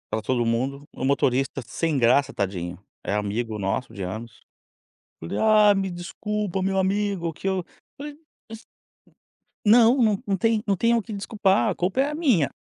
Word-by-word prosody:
Tava 110 - -1
todo 120 +2 0
mundo, 130 +5 -1
o 130 - -4
motorista 135 0 +1
sem 165 -3 -1
graça, 130 +3 +3
tadinho, 90 -3 -3 0.2
é - - -3
amigo 105 +2 -2
nosso 100 +5 -3
de 100 - -8
anos. 110 +5 -7 0.8
Falei: 80 - -5
"Ah, 215 -1 +5
me 195 -1 -1
desculpa, 195 +2 -4
meu 195 0 0
amigo 190 -3 -1
que 190 - -8
eu", 190 0 +1
eu - - -10 0.3
falei: 290 +1 -7 0.3
"Mas" 225 0 -10 1.0
não, 225 -1 +5
não 200 - +1
tem 225 +2 +1
não 200 - +2
tem 230 +5 +2
o 230 - +1
que 220 +1 -8
desculpar, 200 -1 +1
a - - -2
culpa 190 +9 0
é 280 - +1
a 300 - -4
minha. 245 - +2
185 Hz, 175 wpm, -24 LUFS, -, 1.0 s, Ah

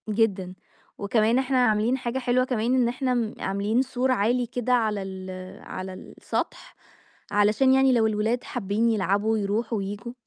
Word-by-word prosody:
جدًا، 200 -4 0 0.4
وكمان 220 +4 +2
إحنا 265 0 0
عاملين 215 +4 +1
حاجة 250 0 -3
حلوة 255 0 +1
كمان 245 0 0
إن 250 -2 +3
إحنا 255 +1 -1
م 230 -3 -1
عاملين 200 +5 0
سور 260 0 -1
عالي 245 +2 +1
كده، 245 +1 -1
على 215 -4 +1
ال 190 -1 -7 0.3
على 185 0 -6
السطح - - -5 0.6
علشان 210 +6 +3
يعني 265 0 +5
لو 225 -2 +3
الولاد 220 +3 0
حابين 220 0 -1
يلعبوا 210 +1 +1
يروحوا 215 +3 -1
وييجوا. 205 +4 -5
225 Hz, 150 wpm, -25 LUFS, 205-250 Hz, 0.6 s, يعني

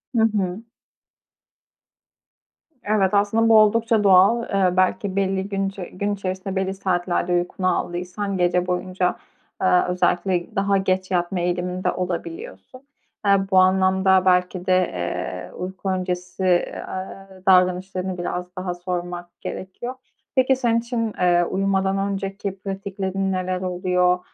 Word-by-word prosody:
Hı 225 - +4
hı. 195 +1 -2 2.2
Evet, 205 -2 +1
aslında 215 +3 +3
bu 225 - +7
oldukça 220 0 +3
doğal. 200 +5 +5
Eee, 185 -3 +1
belki 185 +1 +1
belli 195 0 0
gün 195 -1 -1
içe 195 -2 -7
gün 200 +2 -1
içerisinde 190 0 -4
belli 190 0 -1
saatlerde 180 -2 -1
uykunu 180 +1 0
aldıysan, 180 +3 -3
gece 180 0 +1
boyunca, 180 0 -1 0.5
eee, 180 -1 +4
özellikle 180 +3 0
daha 200 0 +2
geç 190 0 -1
yatma 175 +1 0
eğiliminde 180 +1 -1
olabiliyorsun. 260 - -6 0.4
Eee, 200 0 +5
bu 190 - +4
anlamda 190 0 +4
belki 180 0 +2
de, 185 - +3
eee, 90 - -3
uyku 190 +1 -5
öncesi, 180 0 -3
eee, 180 -1 +1
aaa, 195 +1 -7 0.2
davranışlarını 185 0 +2
biraz 180 +1 -4
daha 185 -1 -3
sormak 175 0 -6
gerekiyor. 215 +7 -6 0.4
Peki 260 0 +4
senin 235 -3 +1
için, 230 -2 -2
eee, 175 -1 +4
uyumadan 195 +1 0
önceki 195 0 -3
pratiklerin 195 -1 -3
neler 185 0 -2
oluyor? 180 0 +1
185 Hz, 125 wpm, -22 LUFS, 180-195 Hz, 2.2 s, bu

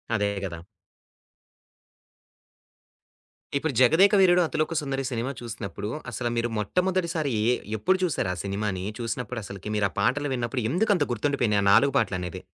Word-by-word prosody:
అదే 105 -2 +1 0.2
గదా! 85 -3 -7 2.9
ఇప్పుడు 150 +1 -2
'జగదేక 165 - +6
వీరుడు 180 -1 +5
అతిలోక 155 +2 -1
సుందరి' 135 -2 -3
సినిమా 120 +2 -2
చూసినప్పుడు, 105 -3 -6 0.2
అసలు 120 +1 -2
మీరు 115 0 0
మొట్టమొదటిసారి 170 - 0 0.2
ఎ - - +4 0.3
ఎప్పుడు 185 - +2
చూసారు 145 - 0
ఆ - - -6
సినిమాని? 100 -1 -2
చూసినప్పుడు 120 0 -4
అసలకి 100 +1 -7
మీరు 105 -1 +2
ఆ - - -20
పాటలు 145 +8 +1
విన్నప్పుడు 120 0 -2
ఎందుకంత 185 -3 +2
గుర్తుండిపోయినాయి 120 -4 +1
ఆ - - +1
4 140 +7 +5
పాటలనేది. 90 -1 -2
120 Hz, 135 wpm, -26 LUFS, 105-155 Hz, 2.9 s, జగదేక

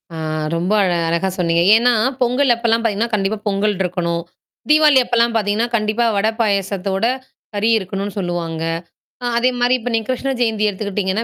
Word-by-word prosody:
அ - - -6 0.4
ரொம்ப 175 +4 -1
அழ 185 - +2 0.2
அழகா 170 +3 0
சொன்னீங்க. 170 -1 +1
ஏன்னா, 240 +2 +3 0.3
பொங்கல் 250 +1 +3
அப்பல்லாம் 230 -1 0
பாத்தீங்கன்னா, 230 +1 -1
கண்டிப்பா 210 +1 0
பொங்கல் 205 +1 +1
இருக்கணும். 170 -2 -1 0.5
தீபவாளி 300 -2 +6
அப்பல்லாம் 235 -1 +1
பாத்தீங்கன்னா, 210 +3 0
கண்டிப்பா 215 +1 0
வட, 200 +2 +1
பாயசத்தோட, 195 -1 -1 0.5
கறி 210 +2 +1
இருக்கனும்னு 195 +1 -5
சொல்லுவாங்க. 170 -3 -3 0.6
அ - - -2
அதே 250 +2 +3
மாரி 245 +1 +3
இப்ப 245 - -4
நீங்க 225 -1 -1
கிருஷ்ண 265 +1 -1
ஜெயந்தி 220 -2 +1
எடுத்துக்கிட்டீங்கன்னா, 205 +1 -2
210 Hz, 155 wpm, -18 LUFS, 190-235 Hz, 0.6 s, தீபவாளி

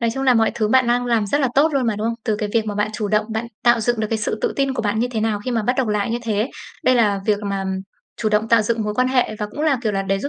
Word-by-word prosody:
Nói 230 -1 +1
chung 270 - -3
là 260 -2 +4
mọi 225 -1 +3
thứ 215 -2 0
bạn 260 +2 +4
đang 245 +1 +1
làm 230 -3 +1
rất 285 +9 +1
là 270 - +2
tốt 305 +3 +4
luôn 265 -3 +1
mà, 220 -2 0
đúng 215 +2 -2
không? 230 - 0
Từ 215 - 0
cái 210 0 -3
việc 225 -2 +1
mà 210 - -3
bạn 210 +1 0
chủ 210 -1 -2
động, 210 +1 +1
bạn 220 +2 -2 0.2
tạo 240 -1 +5
dựng 240 0 0
được 215 - 0
cái 225 - 0
sự 215 0 -2
tự - - +1
tin 275 -1 0
của 235 - -2
bạn 210 0 0
như 240 +2 +1
thế 225 -3 -2
nào 215 -1 0
khi 255 - -2
mà 230 -2 0
bắt 245 - +1
đầu 265 - +1
học 215 - 0
lại 210 +1 -1
như 235 - -1
thế. 220 +2 -1 0.3
Đây 255 - +4
là 210 -5 +2
việc 210 -2 +2
mà 195 -1 -2 0.5
chủ 220 - -1
động 215 +1 +1
tạo 230 -1 +5
dựng 225 +1 -1
mối 210 0 -3
quan 255 +3 +2
hệ 250 -4 +1
và 210 - -2
cũng 295 - -7
là, 300 -4 +2
kiểu 215 -3 0
là, 195 -1 -1
để 195 0 0
giúp 250 - -3
225 Hz, 355 wpm, -21 LUFS, 210-245 Hz, 0.5 s, tạo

